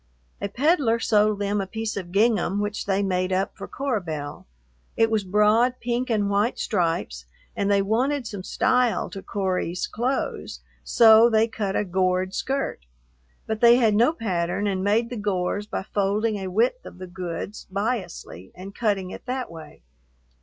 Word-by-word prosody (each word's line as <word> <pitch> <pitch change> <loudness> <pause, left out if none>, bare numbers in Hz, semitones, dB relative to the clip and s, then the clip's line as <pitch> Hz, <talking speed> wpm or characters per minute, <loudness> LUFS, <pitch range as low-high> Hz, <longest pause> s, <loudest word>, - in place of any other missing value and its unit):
A 200 - -2
peddler 265 - +2
sold 215 -2 +2
them 205 0 -1
a 195 - -4
piece 220 +1 -4
of 180 -3 -6
gingham 205 -2 +2
which 205 0 -3
they 200 0 +1
made 185 -1 0
up 190 +1 -1
for - - -8
Cora 270 -6 -2
Belle. 150 -4 -6 0.5
It 225 0 +3
was 215 -2 +1
broad 210 +6 +3
pink 245 +2 -2
and 210 -3 +1
white 205 +4 +1
stripes, 165 - -1 0.3
and 200 - 0
they 200 -1 +3
wanted 250 +6 0
some 205 -3 -6
style 250 +3 +1
to 195 - -7
"Cory's" 185 -3 -2
clothes, 250 +5 -3 0.2
so 225 -1 +6
they 220 0 +3
cut 210 -4 -3
a 210 - +1
gored 185 0 0
skirt. 265 - -3 0.6
But 220 0 -3
they 235 0 +8
had 230 -4 +3
no 235 +7 +4
pattern 190 - -2
and 190 -2 -1
made 225 +4 +1
the 245 - -4
gores 205 0 -2
by - - -4
folding 210 +2 0
a 190 -1 -5
width 235 - +1
of - - -11
the 185 - -7
goods 180 +2 -6
biasly 195 - -4
and 190 +2 -9
cutting 200 -5 -1
it - - -10
that 255 -3 -3
way. 160 - -12
205 Hz, 170 wpm, -24 LUFS, 185-230 Hz, 0.6 s, they